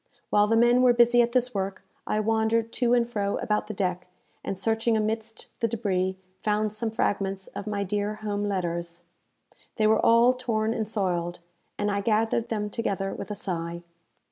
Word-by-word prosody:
While 205 0 +4
the 225 +1 +3
men 240 +2 +5
were 250 -1 +6
busy 240 0 +5
at 235 0 +1
this 250 0 +1
work, 195 -1 -3 0.2
I 215 - +1
wandered 225 +1 +1
to 245 -1 +2
and 235 -1 +2
fro 205 -4 -1
about 210 0 -1
the 215 - -4
deck, 180 -2 -2 0.4
and, 195 - -3
searching 225 +2 +1
amidst 220 +1 -3
the 230 - +1
débris, 190 -5 -1 0.3
found 210 0 0
some 220 +1 -1
fragments 195 -3 -1
of 205 - -6
my 205 -1 -1
dear 205 +2 -2
home 205 -1 -3
letters. 170 -3 -3 0.7
They 215 - +1
were 215 0 +3
all 235 +2 +6
torn 225 -3 -1
and 220 -2 -2
soiled, 175 -5 -1 0.4
and 205 0 0
I 200 0 0
gathered 225 +2 +1
them 210 -2 -2
together 195 -4 -2
with - - -7
a 210 - -3
sigh. 170 -4 -4
215 Hz, 180 wpm, -26 LUFS, 195-225 Hz, 0.7 s, were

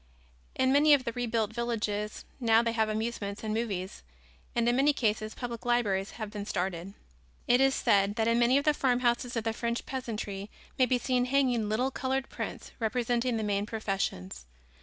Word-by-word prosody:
In 260 0 +2
many 290 +2 +6
of 270 - -2
the 235 - -2
rebuilt 230 -2 -1
villages 215 -3 -2
now 230 -2 +4
they 230 - 0
have 220 -1 +1
amusements 215 -2 -3
and 215 -1 -2
movies 200 - -3 0.5
and 235 0 +2
in 240 - +3
many 280 +3 +4
cases 215 -4 -1
public 235 -2 -5
libraries 210 -5 +1
have 215 -3 -6
been 205 -1 -6
started. 180 +1 -3 0.5
It 245 +2 +5
is 270 0 +4
said 200 0 +2
that 225 -1 +1
in 230 +1 +3
many 240 +3 +4
of 285 - 0
the 300 - +5
farmhouses 245 -2 +1
of 230 - -1
the 225 0 -1
French 235 +1 -2
peasantry 215 -6 -5 0.3
may 255 - +5
be 250 - +2
seen 250 0 +1
hanging 250 -5 +1
little 250 +5 +1
colored 265 0 -2
prints - - -6
representing 240 +1 0
the 220 - -2
main 205 0 0
professions. 190 - -3
230 Hz, 180 wpm, -29 LUFS, 210-245 Hz, 0.5 s, many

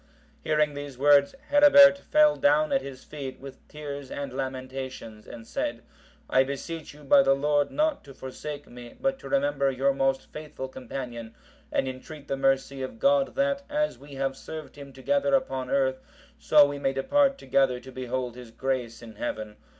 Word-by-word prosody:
Hearing 150 -1 +1
these 145 -2 -7
words, 140 - +4 0.2
Herebert 285 -1 +8
fell 300 +1 +4
down 295 +1 +3
at 270 - +2
his 130 -2 -9
feet, 135 -3 -7
with 135 0 -10
tears 145 -2 -7
and 140 -2 -5
lamentations, 130 -4 -6
and 115 -1 -10
said, - - -3 0.4
"I 130 - +4
beseech 150 +4 -6
you, 150 - -15
by 185 +7 +6
the 135 -6 +3
Lord, 145 +1 +1
not 305 0 0
to 135 -2 -13
forsake 145 +2 -7
me; 120 -1 -12
but 270 0 -1
to - - -9
remember 280 - +1
your 135 +1 +1
most 135 0 0
faithful 150 -3 -7
companion, 125 -3 -7 0.4
and - - 0
entreat 140 +3 -8
the 135 - -1
mercy 135 0 0
of 130 - -6
God 275 +2 +2
that, 280 0 +1
as 300 +1 -1
we 140 0 -12
have 135 0 -2
served 155 +2 -9
Him 140 -1 -11
together 280 - +1
upon 135 - -2
earth, 130 -1 +1 0.4
so 150 -1 +6
we 145 0 -4
may 135 -1 0
depart 275 - +2
together 130 - +1
to 130 +1 -12
behold 125 -1 -4
His 125 -2 -11
grace 125 -1 -3
in 110 -2 -12
Heaven. 110 -2 -4
140 Hz, 175 wpm, -27 LUFS, 130-160 Hz, 0.4 s, Herebert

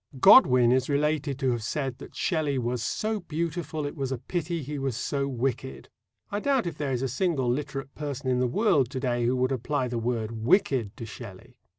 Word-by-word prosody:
Godwin 125 -2 +7
is 130 +1 +2
related 145 -1 0
to 135 -2 +1
have 120 -1 -1
said 130 +2 -3
that - - -11
"Shelley 155 -5 0
was 120 -1 -1
so 215 - -1
beautiful, 165 -2 -3
it 145 - -5
was 135 -3 -3
a 130 - -1
pity 165 +5 -3
he 145 +2 -5
was 135 -4 -2
so 140 +3 -1
wicked." 130 0 -3 0.4
I 205 - -1
doubt 270 0 +1
if 165 -3 -5
there 145 -2 -1
is 130 0 -1
a - - +1
single 135 0 0
literate 135 +1 -3
person 145 -2 -5
in 125 -1 +2
the 125 - +2
world 145 - +2
to 130 - -4
day 120 -2 0
who 125 - +2
would 130 +1 +1
apply 130 +1 -1
the 120 -1 -2
word 115 -1 -2
"wicked" 115 - +1
to 115 - -6
Shelley. 115 +2 -11
135 Hz, 210 wpm, -27 LUFS, 125-150 Hz, 0.4 s, Godwin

